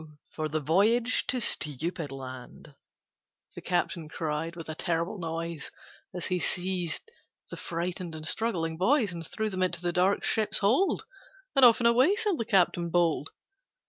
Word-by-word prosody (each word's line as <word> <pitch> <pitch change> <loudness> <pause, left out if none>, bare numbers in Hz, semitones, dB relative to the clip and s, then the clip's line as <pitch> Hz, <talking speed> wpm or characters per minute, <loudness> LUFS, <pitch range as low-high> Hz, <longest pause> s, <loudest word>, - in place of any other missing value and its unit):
for 155 -1 -3
the 155 +1 -1
voyage 215 - +2
to 255 - +1
Stupid 160 - -1
Land,' 130 +1 -9 0.8
The - - -8
captain 170 -3 -1
cried, 160 +1 -3
with 165 -2 -8
a 155 - -4
terrible 170 +4 -2
noise, 165 -2 -4 0.4
As 180 -1 -5
he 180 -1 0
seized 180 -2 -2 0.5
the - - -5
frightened 175 0 -4
and 155 0 -5
struggling 170 -9 -1
boys 215 - +2
And 170 -1 -6
threw 215 +6 -3
them 185 -1 -3
into 175 -2 +1
the 175 0 -2
dark 185 +3 +2
ship's 220 -2 0
hold; 245 - +2 0.5
And 270 - +5
off 240 -1 +8
and 235 - +5
away 255 +11 +5
sailed 415 -6 0
the 230 - -1
captain 180 -5 +2
bold. 165 -3 +1
175 Hz, 160 wpm, -28 LUFS, 165-215 Hz, 0.8 s, off